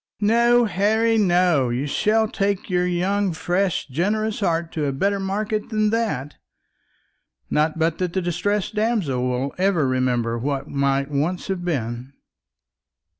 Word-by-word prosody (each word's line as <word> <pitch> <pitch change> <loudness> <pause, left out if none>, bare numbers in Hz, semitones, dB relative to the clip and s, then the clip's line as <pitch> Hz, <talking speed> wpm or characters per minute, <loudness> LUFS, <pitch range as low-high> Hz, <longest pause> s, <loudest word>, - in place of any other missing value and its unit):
"No, 235 +3 +4
Harry, 220 +3 +2
no; 175 - +3
you 125 +4 -1
shall 220 +9 +1
take 200 -2 -2
your 180 0 +1
young 185 +2 0
fresh 180 +2 -1
generous 210 - -1
heart 170 -4 0
to 155 -2 -2
a - - 0
better 200 +9 0
market 210 +2 -2
than 215 -2 +1
that; 210 - -2 1.1
not 155 +1 +1
but 165 0 0
that 180 -2 -2
the 190 - 0
distressed 205 +4 -1
damsel 210 - 0
will 125 +2 -2
ever 185 -7 +2
remember 125 -2 0
what 140 +2 -2
might 140 0 0
once 160 +7 -2
have 185 -2 -2
been." 125 -5 -3
180 Hz, 140 wpm, -22 LUFS, 140-205 Hz, 1.1 s, No